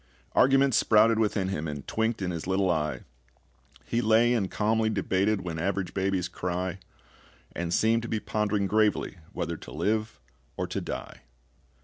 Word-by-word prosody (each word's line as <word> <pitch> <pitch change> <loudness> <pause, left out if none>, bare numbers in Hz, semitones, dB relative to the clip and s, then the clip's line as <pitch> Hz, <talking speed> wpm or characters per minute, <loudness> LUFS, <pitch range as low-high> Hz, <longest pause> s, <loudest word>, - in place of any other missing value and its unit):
Arguments 135 -1 +4
sprouted 110 +1 +4
within 105 -3 +1
him, 80 -4 -3
And 75 -2 -6
twinked 110 -2 -1
in 90 - -1
his 85 0 -5
little 95 -1 +2
eye; 75 -2 -1 0.8
He 120 - 0
lay 115 +2 +4
and 100 -6 0
calmly 110 +4 +1
debated 100 -1 +1
When 85 -3 -5
average 95 +1 -2
babies 95 -2 0
cry, 90 +1 -3 0.8
And 85 0 -3
seemed 115 +5 +3
to 120 - -6
be 110 - -1
pondering 105 -1 -1
gravely 105 -2 +1
whether 85 -4 -3
to - - -11
live 110 -3 -1 0.4
or - - -1
to - - -4
die. - - -6
100 Hz, 155 wpm, -27 LUFS, 90-110 Hz, 0.8 s, Arguments